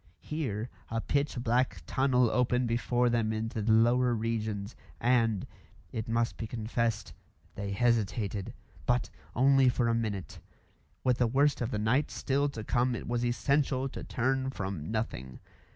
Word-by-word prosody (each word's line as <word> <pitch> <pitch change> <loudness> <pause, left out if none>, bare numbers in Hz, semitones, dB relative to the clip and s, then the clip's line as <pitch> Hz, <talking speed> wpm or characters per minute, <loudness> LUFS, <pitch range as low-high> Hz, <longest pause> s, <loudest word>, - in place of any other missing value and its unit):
Here 125 -7 -3 0.2
a 115 - -1
pitch 140 +3 0
black 125 +2 +1
tunnel 125 -3 +2
opened 125 0 +2
before 120 +1 +1
them 115 -2 +1
into 110 +1 -2
the 110 +2 +1
lower 120 +2 +4
regions, 110 -2 -2 0.2
and 115 -5 +2 0.5
it 110 - -4
must 115 +1 0
be 115 - -4
confessed 115 -1 -2 0.4
they 100 0 -4
hesitated. 105 -3 0 0.3
But 120 0 +1 0.2
only 135 0 +5
for 120 -1 +1
a 115 - +2
minute. 105 -5 -3 0.6
With 125 -2 +2
the 120 - +4
worst 140 +4 +2
of 120 - 0
the 130 - -2
night 115 +8 +2
still 140 +1 0
to 115 -6 -6
come 120 +2 +1
it - - -6
was 120 0 0
essential 135 +2 +1
to - - -7
turn 130 +2 0
from 95 - -4
nothing. 110 - -3
120 Hz, 150 wpm, -30 LUFS, 110-125 Hz, 0.6 s, only